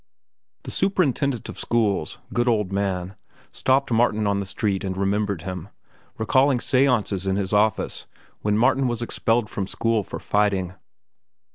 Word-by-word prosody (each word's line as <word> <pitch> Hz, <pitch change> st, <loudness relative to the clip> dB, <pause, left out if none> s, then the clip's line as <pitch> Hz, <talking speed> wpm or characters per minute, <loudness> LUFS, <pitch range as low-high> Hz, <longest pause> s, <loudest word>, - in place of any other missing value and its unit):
The -, -, -6 dB
Superintendent 140 Hz, -, 0 dB
of -, -, -8 dB
Schools, 105 Hz, -9 st, 0 dB, 0.2 s
good 120 Hz, +1 st, +1 dB
old 105 Hz, -5 st, +1 dB
man, 95 Hz, -2 st, -2 dB, 0.4 s
stopped 135 Hz, 0 st, +1 dB
Martin 110 Hz, -2 st, +2 dB
on 100 Hz, -1 st, +1 dB
the 100 Hz, -, -4 dB
street 100 Hz, 0 st, -1 dB
and 95 Hz, -1 st, -3 dB
remembered 100 Hz, -2 st, 0 dB
him, 90 Hz, 0 st, -6 dB, 0.5 s
recalling 130 Hz, +4 st, +3 dB
seances 120 Hz, -8 st, +1 dB
in 95 Hz, -, +1 dB
his 100 Hz, 0 st, -2 dB
office 105 Hz, +1 st, +1 dB, 0.3 s
when 105 Hz, 0 st, +1 dB
Martin 130 Hz, +3 st, +3 dB
was 120 Hz, -1 st, -2 dB
expelled 115 Hz, -1 st, 0 dB
from 100 Hz, -2 st, -4 dB
school 115 Hz, +1 st, 0 dB
for -, -, -7 dB
fighting. 100 Hz, -3 st, 0 dB
105 Hz, 145 wpm, -23 LUFS, 95-120 Hz, 0.5 s, recalling